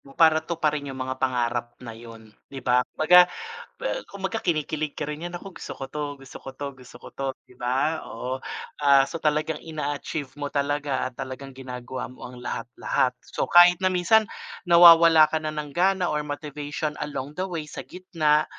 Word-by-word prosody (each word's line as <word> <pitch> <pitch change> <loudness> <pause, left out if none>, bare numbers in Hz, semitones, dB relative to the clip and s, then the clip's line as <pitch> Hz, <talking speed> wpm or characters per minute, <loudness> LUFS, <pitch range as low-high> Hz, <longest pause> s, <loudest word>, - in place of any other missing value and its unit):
mo 135 - -17
para 160 -1 +5
tuparin 150 -4 -2
yung 135 - -6
mga 130 0 -4
pangarap 120 -2 -1
na 115 -2 -9
iyon 115 -1 -13 0.2
di 135 -1 -9
ba, 125 0 +4
kumbaga 180 +3 +6 0.8
kumbaga, 200 +3 -3
kinikilig 155 -2 -1
ka 150 - -5
rin 150 +3 -5
yan 175 0 -5
kung 195 -2 -11
gusto - - -7
ko 135 - -7
ito, 150 +2 -5 0.2
gusto 135 - -12
ko - - -10
ito 145 +1 -6 0.2
gusto 120 - -14
ko - - -13
ito 135 - -5 0.2
di 125 - -19
ba, 135 +6 0
oo, 125 +3 -5 0.4
ah, 140 -1 +6
so 165 - -5
talagang 155 0 0
in 155 -2 -6
achieve 145 -1 -3
mo 145 -1 -5
talaga 145 -1 -1
at 125 - -19
talagang 135 0 -7
ginagawa 130 -1 -6
mo 130 - -10
ang 125 - -12
lahat-lahat, 125 +2 -1
so, - - -3
kahit 175 +1 +7
na 185 - +3
minsan 185 +4 +3 0.4
nawawala 165 -2 +8
ka 160 - +1
na 155 - -3
ng 150 -2 -5
gana 185 0 +2
or 150 - 0
motivation 145 +1 -4
along 145 -1 -4
the 190 - 0
way 165 -4 -4
sa 150 - -8
gitna 160 -5 +1
150 Hz, 185 wpm, -25 LUFS, 130-165 Hz, 0.8 s, nawawala